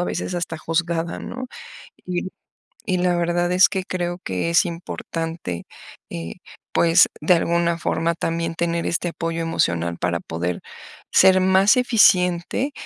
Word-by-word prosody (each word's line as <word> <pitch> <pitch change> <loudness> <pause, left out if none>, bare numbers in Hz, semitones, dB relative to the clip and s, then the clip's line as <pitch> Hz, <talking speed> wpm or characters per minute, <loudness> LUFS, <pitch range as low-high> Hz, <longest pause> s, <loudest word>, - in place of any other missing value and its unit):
a 180 - +1
veces 180 - -3
hasta 165 -2 -3
juzgada, 165 +1 -2
¿no? 255 +1 -6 0.6
Y 180 0 -2 0.6
y 185 -3 0
la 180 -1 +1
verdad 175 +1 0
es 185 +1 +6
que 190 -2 -3
creo 175 -1 -3
que 95 - -2
es 170 - +4
importante, 165 - -5 0.5
eh, 85 0 -6 0.4
pues, 165 0 +5
de 170 +4 +4
alguna 170 0 +1
forma 170 0 0
también 165 0 -2
tener 170 0 -1
este 175 +1 -1
apoyo 165 0 -3
emocional 85 - 0
para 85 -1 -1
poder 85 +2 -4 0.5
ser 185 0 +6
más 190 +4 +4
eficiente, 200 +1 +3
170 Hz, 140 wpm, -22 LUFS, 165-180 Hz, 0.6 s, es